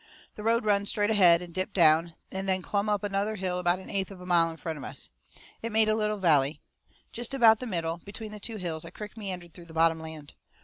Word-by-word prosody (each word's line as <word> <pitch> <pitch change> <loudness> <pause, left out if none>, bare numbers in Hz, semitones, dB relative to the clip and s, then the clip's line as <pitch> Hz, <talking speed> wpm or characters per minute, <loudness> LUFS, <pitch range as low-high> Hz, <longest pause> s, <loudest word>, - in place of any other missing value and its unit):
The - - -9
road 230 +1 +1
run 205 -1 +2
straight 205 0 +2
ahead, 180 -5 +5
and 175 -1 -11
dipped 185 +2 -3
down, 165 -1 +4 0.2
and 190 0 -3
then 185 -1 0
clumb 205 +2 -1
up 210 -1 0
another 205 +1 -1
hill 185 -2 -2
about 175 0 +2
an 190 - -11
eighth 195 -2 -1
of 195 -2 -11
a 180 - -10
mile 170 -2 +3
in 165 - -8
front 160 -2 -5
of - - -8
us. - - -7 0.5
It 230 - -4
made 220 0 +4
a 215 - +3
little 215 -1 0
valley. 150 -6 +2 0.5
Jest 240 +3 -3
about 225 -4 +6
the 255 - -5
middle, 165 -4 -2
between 210 +3 -8
the 210 - -8
two 225 +2 -5
hills, 165 -5 -3
a - - -6
crick 210 0 -9
meandered 185 -6 -7
through 175 - -12
the 165 -1 -14
bottom 165 0 +3
land. 160 -2 -9
190 Hz, 250 wpm, -28 LUFS, 165-210 Hz, 0.5 s, about